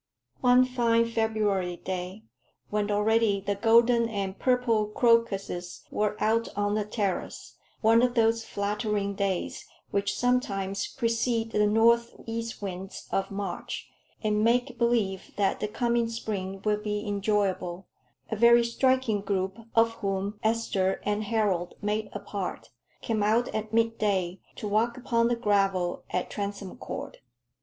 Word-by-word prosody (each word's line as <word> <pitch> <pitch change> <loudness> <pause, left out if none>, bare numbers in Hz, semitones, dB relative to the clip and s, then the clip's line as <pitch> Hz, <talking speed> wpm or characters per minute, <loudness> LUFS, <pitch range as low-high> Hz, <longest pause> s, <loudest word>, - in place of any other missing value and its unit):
One 250 0 +5
fine 235 -2 +2
February 215 -5 0
day, 185 +3 -5 0.5
when 210 0 0
already 210 0 +2
the 200 +1 -1
golden 230 +2 +4
and 195 -3 -3
purple 245 -4 +2
crocuses 210 -6 +1
were 210 0 0
out 230 +1 +2
on 205 0 +1
the 210 -1 0
terrace 205 -3 -3 0.3
one 225 +1 +5
of 250 0 +2
those 225 0 +3
flattering 205 -1 -2
days 195 -2 -2 0.3
which 200 0 0
sometimes 200 -6 0
precede 230 0 0
the 210 -1 +3
north 235 +2 +3
east 230 -1 -5
winds 190 0 -6
of 195 - 0
March, 205 +5 -5 0.3
and 210 0 +1
make 245 +1 +1
believe 225 -6 0
that 200 -2 +1
the 210 - -1
coming 235 +1 0
spring 195 -4 -4
will 210 0 +2
be 210 0 -3
enjoyable 195 -3 -1 0.5
a - - 0
very 235 +2 +6
striking 245 -2 +1
group, 195 -1 -1 0.2
of 230 0 +5
whom 200 +1 -2
Esther 215 -4 0
and 210 +1 0
Harold 200 -6 0
made 210 +1 -2
a 205 - -5
part, 195 -2 -5 0.3
came 220 -2 -1
out 220 +4 +2
at 215 0 -3
midday 210 -5 +1 0.2
to 210 - -5
walk 225 +4 +1
upon 235 -2 +1
the 240 - +1
gravel 195 -5 +1
at 180 - -2
Transome 200 -2 -5
Court. - - -6
210 Hz, 140 wpm, -27 LUFS, 200-230 Hz, 0.5 s, very